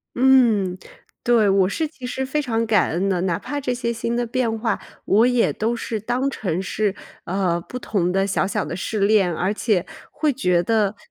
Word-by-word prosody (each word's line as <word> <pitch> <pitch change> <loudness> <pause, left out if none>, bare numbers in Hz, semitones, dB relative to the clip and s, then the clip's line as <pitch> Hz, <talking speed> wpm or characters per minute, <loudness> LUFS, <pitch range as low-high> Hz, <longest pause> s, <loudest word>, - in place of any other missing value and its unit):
嗯， 235 -8 +4 0.5
对， 230 -4 +4
我 195 -1 +4
是 315 - -1
其 275 -4 -11
实 265 +1 -3
非 270 +3 -1
常 230 -6 0
感 215 -4 +3
恩 185 +4 0
的， 180 -2 0
哪 175 -2 0
怕 290 +7 -4
这 250 -3 -2
些 240 -1 -2
新 235 0 -2
的 240 0 -1
变 230 -2 -1
化， 225 0 -1 0.3
我 215 +4 +4
也 245 -1 +2
都 225 +2 -1
是 230 -2 -4
当 245 +5 -1
成 185 -8 -2
是， 205 0 -1 0.3
呃， 180 -1 0
不 250 +8 -7
同 180 -7 0
的 195 +1 +1
小 195 - +1
小 205 +1 -1
的 - - -5
试 210 +3 -3
练， 200 -3 +3
而 180 +4 0
且 210 -4 0 0.3
会 295 0 0
觉 180 -9 +1
得 210 +1 +1
220 Hz, 215 characters per minute, -22 LUFS, 195-245 Hz, 0.5 s, 嗯